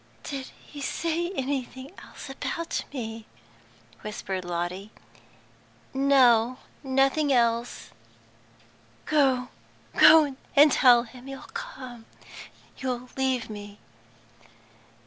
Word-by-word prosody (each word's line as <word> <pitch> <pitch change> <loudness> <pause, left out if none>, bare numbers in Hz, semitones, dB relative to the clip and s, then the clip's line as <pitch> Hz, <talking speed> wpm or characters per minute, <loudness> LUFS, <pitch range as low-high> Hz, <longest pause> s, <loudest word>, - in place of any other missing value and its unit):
"Did 275 -3 -6 0.2
he 290 - -10
say 335 +4 -1
anything 265 0 -4
else - - -11
about 335 +5 -4
me?" 225 -4 -6 0.7
whispered 195 -3 -5
Lotty. 175 +3 -4 1.0
"No, 255 -3 +4 0.3
nothing 270 +2 +2
else." 235 -1 0 1.1
"Go 265 -4 +2 0.5
go 305 -4 +7 0.2
and 295 +1 +7
tell 245 -2 +6
him 250 +2 -13
you'll 270 0 -7
come, 255 - -9 0.7
you'll 250 -1 -4
leave 265 -2 0
me." 205 -1 -9
260 Hz, 90 wpm, -26 LUFS, 235-275 Hz, 1.1 s, go